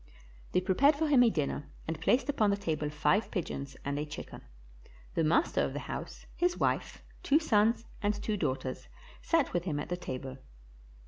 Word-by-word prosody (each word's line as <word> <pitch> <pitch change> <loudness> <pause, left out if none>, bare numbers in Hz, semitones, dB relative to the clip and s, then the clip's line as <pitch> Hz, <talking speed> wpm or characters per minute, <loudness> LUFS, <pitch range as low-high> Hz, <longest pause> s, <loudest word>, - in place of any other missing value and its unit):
They 180 - +3
prepared 255 +11 +4
for 315 +2 0
him 275 -4 +6
a 235 - +6
dinner 145 -5 -2 0.2
and 160 0 -3
placed 250 +11 +3
upon 230 -8 +2
the 200 - +2
table 155 -6 -2
five 150 +8 +1
pigeons 140 - -4
and 140 +1 -1
a 150 - -2
chicken. 150 - -8 0.7
The 165 - +1
master 165 - +3
of - - -1
the - - -3
house, - - -6
his 355 0 +1
wife, - - -1 0.2
two 285 - +4
sons, 230 -6 +2 0.2
and 205 0 +1
two 210 +1 -2
daughters 130 -7 -2 0.3
sat 330 -5 +1
with 175 0 0
him 150 -5 -1
at - - -5
the 175 - -1
table. 130 -4 -6
180 Hz, 185 wpm, -31 LUFS, 150-235 Hz, 0.7 s, him